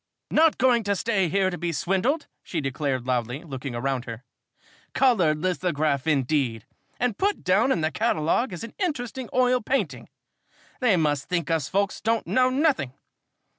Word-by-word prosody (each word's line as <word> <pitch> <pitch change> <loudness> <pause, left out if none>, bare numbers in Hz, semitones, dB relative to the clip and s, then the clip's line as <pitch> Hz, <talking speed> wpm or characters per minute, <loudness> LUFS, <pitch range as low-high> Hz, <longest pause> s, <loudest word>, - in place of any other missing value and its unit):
"Not 320 0 +4
going 245 -3 +3
to 200 0 +1
stay 195 -4 0
here 190 +2 +1
to 180 - -5
be 170 0 -1
swindled!" 195 - 0 0.2
she 170 - -4
declared 135 -2 -2
loudly, 125 +2 -2
looking 135 -4 -6
around 130 0 -2
her. 115 +1 -7 0.7
"Colored 190 - +3
lithograph, 155 -5 -1
indeed, 135 -5 0 0.3
and 245 -4 -1
put 405 +1 0
down 205 +8 +3
in 170 - +1
the 155 +1 0
catalogue 215 +2 +1
as 175 +4 -6
an 230 - -8
interesting 260 - -3
oil 250 0 +3
painting! 265 +5 -2 0.7
They 225 -8 +3
must 145 -4 0
think 170 -4 -1
us 160 -2 0
folks 200 0 0
don't 225 +1 0
know 255 0 +3
nothing. 260 - +1
180 Hz, 160 wpm, -25 LUFS, -, 0.7 s, Not